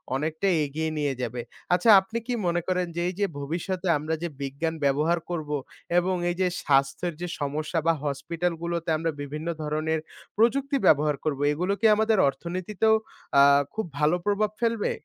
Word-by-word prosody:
অনেকটাই 160 +6 0
এগিয়ে 160 +3 -3
নিয়ে 145 -2 0
যাবে। 120 0 -3 0.3
আচ্ছা 180 +6 +3
আপনি 225 +4 -5
কি 250 - -1
মনে 175 0 +1
করেন 180 -1 0
যে 170 - -1
এই - - -5
যে 205 - +3
ভবিষ্যতে 175 +5 -3
আমরা 155 +2 -3
যে 170 - -1
বিজ্ঞান 140 +4 -2
ব্যবহার 155 +5 +2
করব 160 -4 -4 0.5
এবং 185 +1 0
এই 175 - -1
যে 185 - +3 0.2
স্বাস্থ্যের 140 +5 +1
যে 180 - -2
সমস্যা 150 +3 -2
বা 165 - +5
হসপিটালগুলোতে 170 +3 -2
আমরা 165 0 -1
বিভিন্ন 150 +3 -5 0.2
ধরনের 155 +1 -1 0.4
প্রযুক্তি 275 +5 +2
ব্যবহার 150 -1 +4
করব 145 -3 -1
এগুলো 180 +6 0
কি 225 - 0
আমাদের 220 0 +2
অর্থনীতিতেও 185 +9 0 0.4
আ - - +9 0.3
খুব 220 -2 -2
ভালো 150 +3 +3
প্রভাব 205 +1 +2
ফেলবে? 230 -3 0
170 Hz, 165 wpm, -26 LUFS, 150-185 Hz, 0.5 s, আ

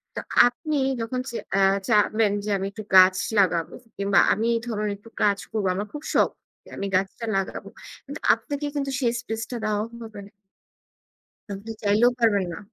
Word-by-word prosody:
তো - - -3 0.3
আপনি 295 +5 -3 0.2
যখন 250 +3 -3
চে 235 - -8 0.2
অ্যা 195 0 +4 0.2
চাইবেন 215 0 +3
যে - - -3
আমি 190 - -3
একটু 215 +1 -8
গাছ 185 0 +8 0.2
লাগাবো 170 -4 +1 0.2
কিংবা 200 0 +3
আমি 220 +3 -2
এই 230 - -1
ধরনের 210 -2 -2
একটু 215 +3 -16
কাজ 200 -1 +3
করবো, 210 -3 -1
আমার 205 +2 -3
খুব 295 0 -7
শখ - - +4 0.3
যে - - -17
আমি 200 - -3
গাছটা 195 +5 -1
লাগাবো, 195 - -4 0.4
কিন্তু - - -7
আপনাকে 290 0 -4
কিন্তু 275 -1 -2
সেই 240 -3 +1
স্পেসটা 230 0 -5
দেওয়া 210 0 0 0.2
হবে 215 -2 -9
না। - - -19 1.2
আপনি 200 +3 -9
চাইলেও 215 +4 +4
পারবেন 210 -5 +3
না। - - -6
215 Hz, 175 wpm, -24 LUFS, 200-235 Hz, 1.2 s, গাছ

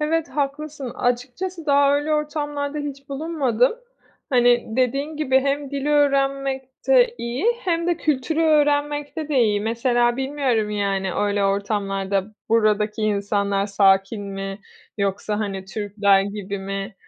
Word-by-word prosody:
Evet, 320 +2 0
haklısın. 285 -1 -3
Açıkçası 275 +8 -2
daha 280 0 +4
öyle 290 +2 0
ortamlarda 295 -1 -2
hiç 280 -1 -6
bulunmadım. 275 -5 +1 0.6
Hani, 245 -1 +4
dediğin 275 +4 0
gibi, 265 -3 +2
hem 280 0 -1
dili 280 +1 -2
öğrenmekte 275 - +2
iyi 235 - -3 0.2
hem 340 -3 -1
de 345 -2 +1
kültürü 305 +1 0
öğrenmekte 295 0 +1
de 285 - +1
iyi. 210 -3 +2
Mesela 240 +2 +1
bilmiyorum, 265 -6 0
yani, 195 -2 -1
öyle 205 -1 +1
ortamlarda 195 -1 -1 0.2
buradaki 215 -1 +2
insanlar 200 -1 0
sakin 195 +1 +2
mi 195 0 -5 0.4
yoksa, 200 +1 -1
hani, 195 -3 -3
Türkler 200 -1 +2
gibi 200 0 -5
mi? 195 +2 -5
250 Hz, 125 wpm, -22 LUFS, 205-290 Hz, 0.6 s, daha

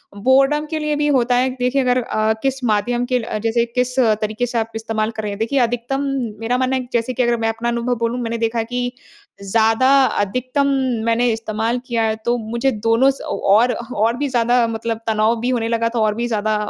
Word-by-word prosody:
Boredom 270 +7 +3
के 315 - -1
लिए 300 -1 -1
भी 295 0 0
होता 245 -1 +2
है 255 +1 +2
देखिए 250 +2 +1
अगर 250 0 +2
अ, 215 -1 0
किस 270 -1 -1
माध्यम 240 +2 0
के 250 - +3
ल 220 -2 -4
जैसे 230 +1 +1
किस 250 +1 -2 0.3
तरीके 215 +3 -1
से 240 0 -4
आप 225 0 -3
इस्तेमाल 225 0 -2
कर 220 -1 -6
रहे 210 - -3
हैं। 200 - -7
देखिए, 230 +5 0
अधिकतम 245 +3 -1 0.4
मेरा 235 +2 0
मानना 260 +1 0
है 255 -1 -3
जैसे 240 +1 0
कि 250 - 0
अगर 240 0 +1
मैं 225 0 0
अपना 230 +1 -2
अनुभव 235 +1 -1
बोलूँ, 235 +1 -2
मैंने 230 0 -2
देखा 230 0 -1
कि 245 +1 -3 0.5
ज़्यादा 225 +5 +2 0.2
अधिकतम 255 +8 -1 0.4
मैंने 235 +1 +2
इस्तेमाल 225 +2 -2
किया 235 -2 0
है, 220 0 +1
तो 240 +1 +1
मुझे 235 +4 -1
दोनों 230 +4 +2
स 270 - -11
औ - - -4 0.2
और 240 +4 +4
और 230 -1 -1
भी 290 +2 -1
ज़्यादा 240 -1 +2
मतलब 225 0 -3
तनाव 220 +1 +2
भी 245 - -1
होने 235 -3 0
लगा 230 0 0
था - - +1
और 215 -1 +1
भी 235 +2 -2
ज़्यादा 215 -2 0
235 Hz, 220 wpm, -19 LUFS, 225-250 Hz, 0.5 s, और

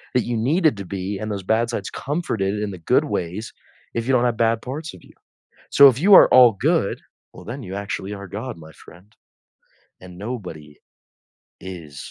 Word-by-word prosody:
that 125 - +2
you 120 - -2
needed 145 - +1
to 100 - -7
be, 95 +1 -5
and 110 0 -4
those 100 -2 -4
bad 115 +4 +1
sides 105 -5 -4
comforted 110 - -2
in 100 - -3
the 90 - -9
good 80 - +2
ways, 90 +6 -4 0.4
if 115 +1 -3
you 135 - +2
don't 125 -1 +3
have 120 -2 0
bad 115 0 +1
parts 145 0 -6
of 90 - -17
you. - - -19 0.6
So, 140 -1 +8
if 125 +1 -2
you 200 +4 +5
are - - +8
all 125 -3 +8
good, - - 0 0.3
well - - -12
then 125 +4 -7
you 95 0 -7
actually 100 0 -5
are 100 -1 -8
God, 115 +5 -6
my 80 0 -13
friend. 90 +7 -18 0.9
And 90 -1 -12
nobody 90 -10 -7 0.9
is 85 -6 -9
105 Hz, 195 wpm, -22 LUFS, 95-125 Hz, 0.9 s, So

